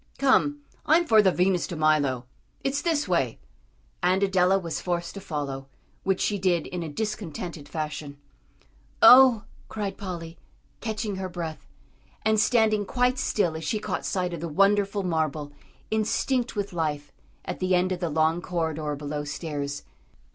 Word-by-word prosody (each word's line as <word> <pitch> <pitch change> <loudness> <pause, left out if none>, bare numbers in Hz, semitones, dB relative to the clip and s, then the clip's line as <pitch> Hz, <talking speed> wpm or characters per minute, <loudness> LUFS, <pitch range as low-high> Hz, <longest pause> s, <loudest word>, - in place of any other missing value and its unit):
"Come, 290 +2 +3 0.3
I'm 335 +3 +5
for 220 -7 +6
the 190 -2 +4
Venus 180 0 +1
de 175 - -5
Milo. 145 -5 +2 0.4
It's 275 +1 0
this 320 -7 0
way;" 135 -10 0 0.6
and 185 +2 +2
Adela 190 -1 +3
was 170 -4 -4
forced 175 -1 -2
to 200 - -8
follow, 140 -6 -4 0.3
which 190 -1 0
she 205 -1 0
did 180 -3 +1
in 180 - -5
a 165 - -4
discontented 175 -5 -5
fashion. 150 -2 -5 0.9
"Oh!" 255 -7 +9 0.3
cried 205 -3 -4
Polly, 170 -4 -6 0.4
catching 215 -3 -3
her 190 -1 -4
breath, 170 -3 -6 0.6
and 220 0 +3
standing 215 -2 +3
quite 250 +4 +1
still 175 -6 0
as 160 - -5
she 215 - -1
caught 210 - -3
sight 180 -2 -1
of 165 - -5
the 170 - -3
wonderful 200 +4 +2
marble, 155 -4 -1 0.4
instinct 235 +3 0
with 200 -2 -3
life, 150 -3 -2 0.3
at - - -5
the 185 0 +2
end 180 +1 +1
of 180 - -2
the 170 -2 -1
long 160 +2 +1
corridor 160 -4 -2
below 145 +1 -4
stairs. 145 -1 -4
180 Hz, 155 wpm, -26 LUFS, 155-210 Hz, 0.9 s, Oh